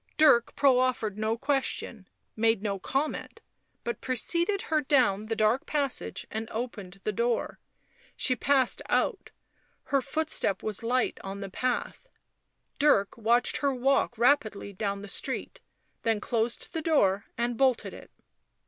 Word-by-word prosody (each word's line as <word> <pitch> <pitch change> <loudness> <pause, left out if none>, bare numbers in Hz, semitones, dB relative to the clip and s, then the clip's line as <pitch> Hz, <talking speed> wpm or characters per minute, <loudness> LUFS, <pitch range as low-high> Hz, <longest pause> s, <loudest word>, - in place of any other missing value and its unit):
Dirk 265 -7 +5
proffered 255 -6 +2
no 220 +1 0
question, 265 -6 -2 0.3
made 225 -2 +2
no 200 -2 -2
comment, 280 +9 -3 0.4
but 235 - -4
preceded 340 - 0
her 310 -2 +1
down 245 -8 +2
the 225 - -1
dark 220 +4 +2
passage 285 -3 -2
and 220 +1 -4
opened 210 -5 -6
the 215 - 0
door; 235 +3 -1 0.6
she 255 - +1
passed 265 0 +2
out; 455 - 0 0.5
her 275 -1 +1
footstep 305 -7 -1
was 215 -2 -2
light 245 +2 0
on 195 +1 -6
the 195 -1 -6
path; 255 - -2 0.7
Dirk 240 -9 +3
watched 235 +2 +2
her 280 -2 0
walk 255 -1 +1
rapidly 230 -5 +2
down 200 0 -3
the - - -7
street, 195 - -3 0.4
then 225 -2 +1
closed 230 +2 -2
the 325 - -2
door 200 - +2
and 240 +1 0
bolted 260 0 +1
it. - - -12
235 Hz, 140 wpm, -28 LUFS, 215-275 Hz, 0.7 s, Dirk